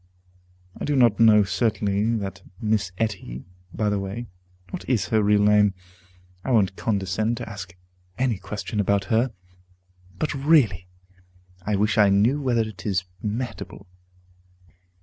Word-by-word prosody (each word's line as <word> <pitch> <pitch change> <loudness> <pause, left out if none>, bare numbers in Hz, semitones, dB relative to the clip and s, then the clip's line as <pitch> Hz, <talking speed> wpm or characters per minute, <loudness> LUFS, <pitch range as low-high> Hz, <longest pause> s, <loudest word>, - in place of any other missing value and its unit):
I - - -7
do 145 - 0
not 120 -5 +4
know 110 -2 +7
certainly 105 +1 0
that 100 -3 -5 0.2
Miss 105 -4 0
Etty 95 - -3 0.3
By 105 +2 -1
the 100 - 0
way, 100 +5 -5 0.5
what - - -5
is 105 -8 +1
her 110 -1 +3
real 105 0 +3
name? 105 -1 +4 0.7
I - - -4
won't 100 -6 +3
condescend 110 +2 -1
to - - -6
ask 95 -4 -8 0.4
any 125 -6 0
question 105 +2 -5
about 100 -1 +2
her. 120 +3 +2 0.9
But 155 - -1
really, 135 - +3 0.8
I 105 - +1
wish 105 +1 +1
I 105 -1 +6
knew 110 +9 +3
whether 125 -4 +1
it 110 -3 -6
is 95 -3 0 0.2
Mehitable. 115 +4 -5
105 Hz, 140 wpm, -24 LUFS, 100-115 Hz, 0.9 s, know